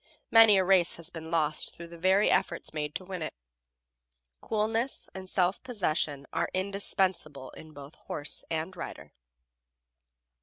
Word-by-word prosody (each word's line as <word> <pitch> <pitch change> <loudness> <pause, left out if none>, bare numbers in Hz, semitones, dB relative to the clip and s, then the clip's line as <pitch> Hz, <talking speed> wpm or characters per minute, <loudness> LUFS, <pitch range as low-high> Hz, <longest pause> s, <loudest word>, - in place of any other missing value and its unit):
Many 225 -3 +8
a 190 - +4
race 185 -2 +4
has 165 -1 -6
been 160 -1 -8
lost 155 -2 0
through 170 0 -10
the 170 - -11
very 190 +4 +4
efforts 170 -2 0
made 150 -1 -3
to 185 - -4
win 185 -2 -6
it. 155 - -4 1.1
Coolness 225 +4 -1
and 190 -1 -8
self 185 0 +1
possession 155 - -1
are - - 0
indispensable 185 -7 -1
in 155 - -12
both 140 0 -11
horse 145 - -4
and 165 +3 -3
rider. - - -8
175 Hz, 145 wpm, -29 LUFS, 155-195 Hz, 1.1 s, Many